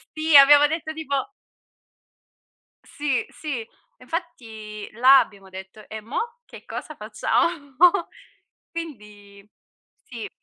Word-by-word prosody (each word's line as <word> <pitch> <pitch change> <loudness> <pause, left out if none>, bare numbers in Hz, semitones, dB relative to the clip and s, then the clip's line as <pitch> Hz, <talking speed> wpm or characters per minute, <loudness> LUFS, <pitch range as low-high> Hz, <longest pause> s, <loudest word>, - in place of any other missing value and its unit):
Sì, 310 -1 +1
abbiamo 290 +1 +8
detto 315 0 -4
tipo 315 +4 -3 1.5
Sì, 290 -3 -2
sì. 250 -8 -6 0.3
Infatti 220 - -7
là 260 +4 +7
abbiamo 195 -5 -5
detto: 190 +3 -11
"E 220 0 -7
mo 465 - -5
che - - -13
cosa - - -7
facciamo?" 285 -6 -2 1.0
Quindi 210 -11 -10 0.6
sì. 235 -4 -8
270 Hz, 100 wpm, -23 LUFS, 215-315 Hz, 1.5 s, abbiamo